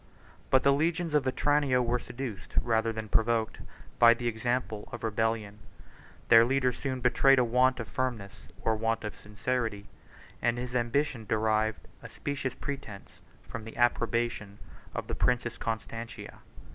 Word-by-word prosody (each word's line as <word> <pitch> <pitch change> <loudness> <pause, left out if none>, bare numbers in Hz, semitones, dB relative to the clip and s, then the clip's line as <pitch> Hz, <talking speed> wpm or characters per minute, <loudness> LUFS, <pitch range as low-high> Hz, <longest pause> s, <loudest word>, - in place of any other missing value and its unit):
But 130 - +4
the 140 - +5
legions 160 +2 0
of 150 -3 +3
Vetranio 140 0 +2
were 120 0 +1
seduced, 120 -5 -7
rather 115 -1 +1
than 110 -1 -5
provoked, 110 +1 +1 0.4
by 120 0 +8
the 120 0 -3
example 115 -1 -2
of 120 - -7
rebellion; 110 -1 -1 0.7
their 115 -1 +9
leader 130 +1 +2
soon 130 0 -4
betrayed 130 +2 +5
a 125 - +5
want 125 +2 +3
of 115 - -4
firmness, 120 -7 -3 0.2
or 115 - +2
a - - -2
want 115 +1 -1
of 105 - -5
sincerity; 105 -1 -3 0.5
and 120 0 +1
his 125 0 -5
ambition 120 -1 0
derived 110 0 0
a - - -9
specious 140 -3 -4
pretence 135 -8 -7 0.3
from 115 - -6
the 115 - -10
approbation 120 -3 0 0.4
of - - -3
the - - -4
princess 120 -1 0
Constantina. 115 +1 -5
120 Hz, 150 wpm, -29 LUFS, 110-130 Hz, 0.7 s, their